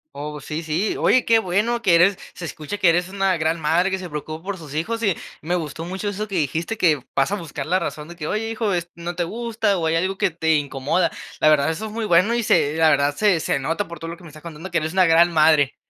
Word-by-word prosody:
Oh, 150 Hz, 0 st, -6 dB
sí, 150 Hz, +3 st, -4 dB
sí. 165 Hz, +6 st, -1 dB
Oye, 255 Hz, -, +4 dB
qué 230 Hz, -1 st, +4 dB
bueno 220 Hz, +5 st, 0 dB
que 190 Hz, -6 st, +4 dB
eres, 180 Hz, +3 st, +4 dB, 0.2 s
se -, -, -10 dB
escucha 160 Hz, +3 st, -5 dB
que 190 Hz, -4 st, +4 dB
eres 175 Hz, +1 st, +2 dB
una 195 Hz, -1 st, 0 dB
gran 160 Hz, +1 st, -1 dB
madre 170 Hz, +5 st, +2 dB
que 190 Hz, -, -1 dB
se 185 Hz, -2 st, -7 dB
preocupa 155 Hz, +1 st, -6 dB
por 195 Hz, 0 st, -4 dB
sus 155 Hz, -5 st, -10 dB
hijos 225 Hz, +9 st, -2 dB
y 195 Hz, -5 st, +2 dB, 0.3 s
me 175 Hz, +3 st, -1 dB
gustó 160 Hz, -1 st, -4 dB
mucho 190 Hz, +3 st, -3 dB
eso 205 Hz, +2 st, -4 dB
que 195 Hz, -, -5 dB
dijiste 165 Hz, +6 st, -1 dB
que 155 Hz, -8 st, +3 dB
vas 135 Hz, +6 st, +2 dB
a -, -, +1 dB
buscar 155 Hz, -7 st, -6 dB
la 185 Hz, +4 st, +1 dB
razón 150 Hz, -4 st, -5 dB
de 175 Hz, -, -11 dB
que: 155 Hz, -2 st, -5 dB
"Oye 220 Hz, +4 st, -2 dB
hijo 225 Hz, -3 st, -1 dB
es 175 Hz, -1 st, -2 dB
no 170 Hz, +1 st, -6 dB
te 175 Hz, -, 0 dB
gusta 225 Hz, +1 st, -1 dB
o 165 Hz, -, -2 dB
hay 160 Hz, -, +1 dB
algo 190 Hz, +3 st, 0 dB
que -, -, +2 dB
te 160 Hz, -1 st, +1 dB
incomoda". 145 Hz, +3 st, 0 dB, 0.3 s
La -, -, +3 dB
verdad, 150 Hz, -1 st, +4 dB
eso 165 Hz, +7 st, -3 dB
es 215 Hz, -, -6 dB
muy 230 Hz, 0 st, -3 dB
bueno 200 Hz, +4 st, +3 dB
y 240 Hz, -, 0 dB
se 145 Hz, -8 st, +2 dB
la 160 Hz, 0 st, +4 dB
verdad 145 Hz, -1 st, +2 dB
se 200 Hz, -3 st, +3 dB
se -, -, 0 dB
nota 165 Hz, +9 st, -2 dB
por 170 Hz, -1 st, -9 dB
todo 165 Hz, +1 st, -6 dB
lo 170 Hz, -, -8 dB
que 180 Hz, -, -17 dB
me -, -, -10 dB
estás 155 Hz, 0 st, -14 dB
contando 165 Hz, +2 st, -8 dB
que 170 Hz, -2 st, +1 dB
eres 155 Hz, 0 st, -3 dB
una 185 Hz, +1 st, +4 dB
gran 170 Hz, +1 st, +5 dB
madre. 155 Hz, -3 st, +4 dB
170 Hz, 275 wpm, -22 LUFS, 155-195 Hz, 0.3 s, gran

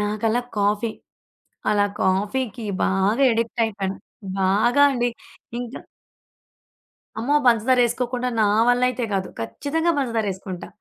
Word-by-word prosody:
నాకలా 215 Hz, +3 st, 0 dB, 0.2 s
కాఫీ. 210 Hz, +2 st, +1 dB, 0.8 s
అలా 205 Hz, -1 st, +3 dB, 0.2 s
కాఫీకి 205 Hz, +5 st, -1 dB, 0.2 s
బాగా 200 Hz, +8 st, +2 dB
అడిక్ట్ 230 Hz, +1 st, -1 dB
అయిపోయాను. 195 Hz, -3 st, -3 dB, 0.5 s
బాగా 220 Hz, +8 st, +3 dB
అండి. 245 Hz, -2 st, +1 dB, 0.5 s
ఇంకా 245 Hz, +1 st, -6 dB, 1.4 s
అమ్మో! 270 Hz, +6 st, +1 dB
పంచదారేసుకోకుండా 245 Hz, +1 st, +2 dB
నా 210 Hz, -, +4 dB, 0.2 s
వల్లయితే 250 Hz, 0 st, +2 dB
గాదు. 190 Hz, -1 st, -1 dB
ఖచ్చితంగా 285 Hz, -, -1 dB
పంచదారేసుకుంటా. 205 Hz, -8 st, -3 dB
225 Hz, 95 wpm, -23 LUFS, 205-245 Hz, 1.4 s, నా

